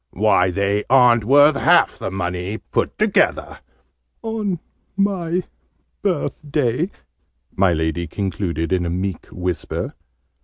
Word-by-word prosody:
"Why, 95 -2 +2
they 100 +2 0
aren't 120 -4 +5
worth 145 +4 +6
half 170 +4 +3
the - - -3
money, 90 +2 -3
put - - -3
together!" 215 -1 +1 0.6
"On 215 -5 -2 0.4
my 185 -3 0 0.6
birthday," 150 - -1 0.7
my 95 -2 +3
Lady 80 +1 -1
concluded 85 -2 -2
in 90 -1 +1
a 85 - -2
meek 90 0 -3
whisper. 90 -1 -3
105 Hz, 110 wpm, -20 LUFS, -, 0.7 s, worth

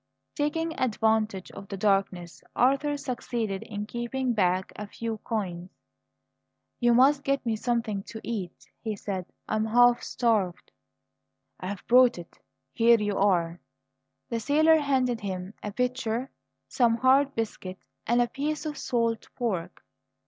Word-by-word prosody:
Taking 320 +2 -1
advantage 220 -5 0
of 195 - -10
the 195 - -6
darkness, 195 -3 0
Arthur 275 +3 +2
succeeded 235 -7 -3
in 210 -1 -5
keeping 240 +3 -2
back 185 -3 +1
a 210 - -6
few 225 +1 -5
coins. 185 -6 -4 1.1
"You 240 -1 +4
must 275 +3 +5
get 275 -2 0
me 225 -2 +1
something 225 -3 -1
to 220 - -8
eat," 200 -7 -5
he 220 -2 -3
said; 190 -2 -4 0.2
"I 215 - 0
am 215 - +1
half 245 +2 +5
starved." 210 -8 0 0.9
"I've 190 +1 -6
brought 250 -2 +5
it. 170 -1 -11 0.3
Here 235 0 +5
you 205 -1 -1
are." 175 -4 +2 0.7
The 230 - -1
sailor 310 +7 +4
handed 260 -5 +1
him 190 -1 -5
a 210 - -4
pitcher, 250 +1 -2 0.4
some 235 -3 +2
hard 270 +3 +4
biscuit, 195 -4 -4 0.3
and 240 +1 +4
a - - -2
piece 295 +4 -3
of 300 -2 -4
salt 230 -2 -1
pork. 185 -8 -3
230 Hz, 140 wpm, -27 LUFS, 200-255 Hz, 1.1 s, must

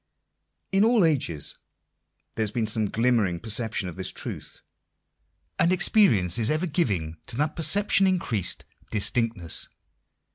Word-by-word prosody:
In 195 +1 +3
all 225 -4 +4
ages 125 - 0 0.7
there - - -4
has 110 - +1
been 115 +1 -2
some 110 -1 -1
glimmering 115 -7 +1
perception 110 -2 -2
of 90 - -8
this 95 - -1
truth; - - -7 1.0
and 170 - +3
experience 125 - +4
is 110 - +3
ever 155 +4 0
giving 100 - -2
to 115 - -5
that 150 +2 -1
perception 195 +3 +2
increased 125 - -1 0.2
distinctness. 110 -4 0
115 Hz, 130 wpm, -25 LUFS, 100-165 Hz, 1.0 s, all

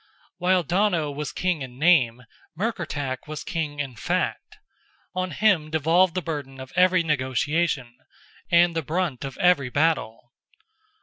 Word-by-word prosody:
While 180 0 +2
Donogh 175 -4 +1
was 150 0 -4
king 180 -4 -1
in 125 -2 -8
name, 130 -7 +3 0.3
Murkertach 145 - -3
was 155 0 -6
king 150 -4 -3
in 135 -4 -4
fact; - - -2 0.6
on 185 0 -2
him 180 -3 +2
devolved 165 +4 +3
the 185 - -1
burden 140 -5 -5
of 130 0 -10
every 185 0 +4
negotiation, 140 -2 -1 0.5
and 170 -1 +4
the 165 - 0
brunt 160 -3 -2
of 135 -1 -6
every 175 -8 +3
battle. 125 -6 0
155 Hz, 135 wpm, -24 LUFS, 135-180 Hz, 0.6 s, every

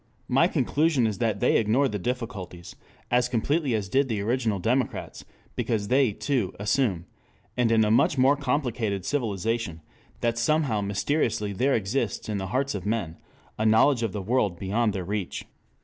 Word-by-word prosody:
My - - +4
conclusion 150 -5 +1
is 110 -1 -2
that 110 -4 0
they - - +4
ignore 115 +6 +2
the 105 -5 -3
difficulties, 100 -6 -5 0.4
as 125 0 +2
completely 135 +2 0
as 105 -3 -2
did 135 +6 +1
the 110 -3 -1
original 115 -1 0
democrats, 120 +7 -2 0.3
because 105 -3 -1
they, 130 -2 +3
too, 120 -2 -2
assume, 105 -5 0 0.5
and 120 -2 +2
in 110 -1 +4
a 105 - +1
much 120 +5 +3
more 130 +2 +5
complicated 125 -8 -1
civilization, 115 - -2 0.4
that 115 0 0
somehow 135 -4 +1
mysteriously 105 +1 -1
there 130 +8 +1
exists 110 +1 -2
in 105 -2 -1
the 95 - -4
hearts 135 +7 -1
of - - -4
men 100 -7 -2 0.4
a - - +1
knowledge 115 +4 +4
of 115 -3 -1
the 100 -1 -5
world 105 -4 0
beyond 105 +4 0
their 95 -2 -4
reach. 100 -1 -4
115 Hz, 165 wpm, -26 LUFS, 100-130 Hz, 0.5 s, more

